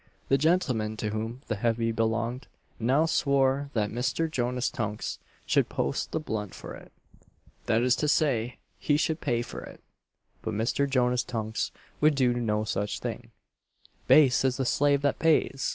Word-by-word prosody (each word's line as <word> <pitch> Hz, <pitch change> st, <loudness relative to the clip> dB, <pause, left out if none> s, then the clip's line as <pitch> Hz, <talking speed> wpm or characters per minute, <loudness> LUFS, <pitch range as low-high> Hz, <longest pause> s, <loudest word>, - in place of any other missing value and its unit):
The 135 Hz, -, +5 dB
gentleman 130 Hz, -10 st, +1 dB
to 105 Hz, -1 st, -2 dB
whom 115 Hz, +5 st, -4 dB
the 115 Hz, -2 st, -3 dB
heavy 115 Hz, +1 st, 0 dB
belonged, 115 Hz, +3 st, -1 dB, 0.3 s
now 130 Hz, +7 st, +3 dB
swore 140 Hz, -3 st, +2 dB
that 105 Hz, -2 st, 0 dB
Mr. 125 Hz, +7 st, -1 dB
Jonas 125 Hz, -4 st, -1 dB
Tunks 105 Hz, -3 st, -4 dB, 0.3 s
should -, -, +2 dB
post 70 Hz, -, -2 dB
the 160 Hz, -, -1 dB
blunt 105 Hz, -, -4 dB
for -, -, -8 dB
it -, -, -13 dB, 0.8 s
that 115 Hz, 0 st, +2 dB
is 125 Hz, -1 st, +4 dB
to 150 Hz, -, 0 dB
say, 125 Hz, -6 st, +1 dB, 0.2 s
he 145 Hz, -, +2 dB
should 160 Hz, +1 st, -1 dB
pay 120 Hz, -5 st, 0 dB
for -, -, -8 dB
it. -, -, -11 dB, 0.6 s
But 110 Hz, -1 st, -3 dB
Mr. 120 Hz, +6 st, 0 dB
Jonas 125 Hz, -2 st, +2 dB
Tunks 110 Hz, -2 st, -3 dB, 0.3 s
would 150 Hz, 0 st, +4 dB
do 125 Hz, -3 st, +3 dB
no 110 Hz, -3 st, 0 dB
such 105 Hz, -1 st, -2 dB
thing -, -, -5 dB, 0.8 s
"Base 135 Hz, -5 st, +6 dB
is 130 Hz, -1 st, +1 dB
the 135 Hz, -, -1 dB
slave 145 Hz, +2 st, +2 dB
that 145 Hz, -, +1 dB
pays!" 155 Hz, -4 st, +2 dB
125 Hz, 165 wpm, -28 LUFS, 110-140 Hz, 0.8 s, Base